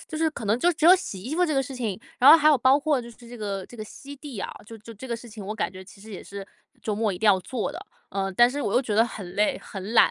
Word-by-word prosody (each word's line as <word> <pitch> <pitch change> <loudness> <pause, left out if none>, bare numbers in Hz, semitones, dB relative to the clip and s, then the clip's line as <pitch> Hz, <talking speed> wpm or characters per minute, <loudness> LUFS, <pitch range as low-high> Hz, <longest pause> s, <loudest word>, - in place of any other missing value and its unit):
就 315 - -6
是 320 0 +2
可 240 - -8
能 210 +3 +1
就 350 +7 +3
只 310 - -3
有 360 - +10
洗 200 - -5
衣 255 +9 -4
服 360 +2 +3
这 310 - -1
个 270 - +2
事 265 +1 -8
情， 225 -7 -3 0.2
然 260 - +8
后 320 - +11
还 305 -2 +1
有 300 - +6
包 260 +3 +5
括 295 -2 +1
就 235 0 -10
是 230 - -17
这 240 0 -12
个 200 -4 -4
这 240 - -13
个 215 - -6
吸 280 +6 -11
地 275 -5 -9
啊， - - -4 0.2
就 225 - -10
就 225 +2 -12
这 260 +6 -10
个 235 - -2
事 235 +1 -12
情 215 -2 -9
我 210 +3 -4
感 210 - -2
觉 185 0 -10
其 195 +1 -16
实 220 +2 -12
也 195 - -8
是 200 -1 -9 0.4
周 215 - -2
末 215 -1 0
一 180 - -6
定 220 - 0
要 195 -3 +5
做 250 +6 -4
的， 330 - -7 0.3
呃， 195 -1 -2
但 240 +5 +5
是 285 +3 -4
我 210 -6 -2
又 250 - +4
觉 220 -5 -2
得 225 +2 +5
很 200 -6 -7
累、 210 +1 +1
很 195 +3 -7
懒， - - +6
230 Hz, 355 characters per minute, -25 LUFS, 205-270 Hz, 0.4 s, 后